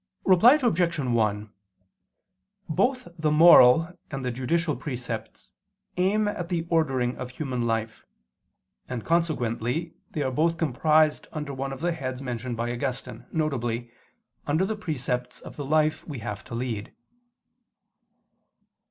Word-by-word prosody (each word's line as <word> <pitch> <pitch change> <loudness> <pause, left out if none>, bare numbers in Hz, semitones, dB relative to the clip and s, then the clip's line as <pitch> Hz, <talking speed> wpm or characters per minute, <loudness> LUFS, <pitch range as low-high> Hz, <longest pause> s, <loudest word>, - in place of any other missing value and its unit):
Reply 195 +8 +7
Obj. 175 - +1
1: 110 -6 0 1.1
Both 250 - 0
the 155 -1 +2
moral 165 0 +7 0.2
and 135 -3 -5
the 125 - 0
judicial 150 +6 0
precepts 120 -5 -6 0.4
aim 205 +4 +2
at 175 -4 -3
the 170 -2 -1
ordering 135 -7 +1
of 125 - -5
human 130 -3 -3
life: 115 0 -2 0.9
and 125 -3 -4
consequently 155 -2 0 0.2
they 150 - -2
are 130 - -1
both 165 +5 +1
comprised 155 +1 +2
under 150 -2 -5
one 135 +1 -4
of 135 - -7
the 175 +1 +1
heads 130 -6 -4
mentioned 125 -2 -4
by 120 +1 -2
Augustine, 125 +1 -5
viz. 120 -7 -2 0.6
under 155 +6 +2
the 220 +2 -2
precepts 125 -10 -3
of - - -11
the 145 - -5
life 155 +2 +2
we 145 -4 -5
have 105 -3 -6
to 115 - -7
lead. 115 -4 -4
140 Hz, 135 wpm, -26 LUFS, 120-165 Hz, 1.1 s, Reply